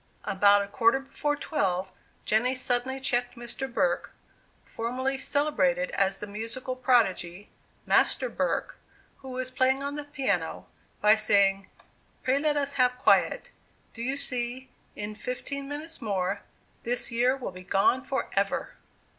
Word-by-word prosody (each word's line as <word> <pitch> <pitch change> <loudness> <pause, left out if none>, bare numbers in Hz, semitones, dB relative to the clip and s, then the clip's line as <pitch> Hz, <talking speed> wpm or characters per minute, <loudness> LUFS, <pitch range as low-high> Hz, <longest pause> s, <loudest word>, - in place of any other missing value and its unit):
About 200 0 +4
a - - -6
quarter 230 +5 +3
before 290 +2 -2
twelve, 190 - -1 0.3
Jenny 245 +4 +2
suddenly 255 +1 -1
checked 245 -2 0
Mr. 240 +3 -4
Burke, 175 -6 0 0.5
formerly 260 +4 -2
celebrated 190 -13 +1
as 195 0 +1
the - - -4
musical 230 +5 -5
prodigy, 205 -7 +1 0.4
"Master - - +3
Burke," - - -2 0.4
who 265 - -10
was 255 0 -4
playing 260 +1 +2
on 280 0 -3
the 295 0 -4
piano, 290 -2 -2 0.4
by 210 +1 +7
saying, 195 -2 +3 0.6
"Pray 260 +2 +2
let 295 0 +1
us 280 0 0
have 250 0 +3
quiet; - - +3 0.4
do 230 - -8
you 265 +3 -1
see, 250 0 -1 0.3
in 210 +1 -4
fifteen 275 +5 -5
minutes 310 +3 -5
more, 200 -2 -1 0.4
this 240 +1 +1
year 250 +3 +2
will 255 - -5
be 185 0 -10
gone 195 +7 +2
forever!" 270 - -2
245 Hz, 140 wpm, -28 LUFS, 205-270 Hz, 0.6 s, by